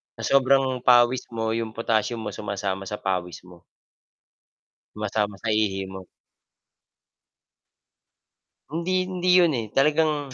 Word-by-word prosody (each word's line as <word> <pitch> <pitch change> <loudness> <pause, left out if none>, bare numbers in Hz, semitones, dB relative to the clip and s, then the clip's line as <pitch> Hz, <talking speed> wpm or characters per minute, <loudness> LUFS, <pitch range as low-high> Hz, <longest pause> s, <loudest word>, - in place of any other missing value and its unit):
Sa - - -9 0.2
sobrang 130 -1 +2
pawis 125 0 +4
mo, 110 -1 -3
yung 115 0 -3
potassium 115 0 -1
mo - - -4
sumasama 100 -2 -4
sa 105 - -4
pawis 90 -4 -4
mo. 90 -1 -15 1.3
Sumasama 105 -1 -2
sa 115 - -2
ihi 105 -3 0
mo. 95 -1 -9 2.7
Hindi 185 +2 0
hindi 185 -1 -2
'yon 170 -4 +4
eh 110 - -6
talagang 150 +1 +1
115 Hz, 115 wpm, -24 LUFS, 100-135 Hz, 2.7 s, pawis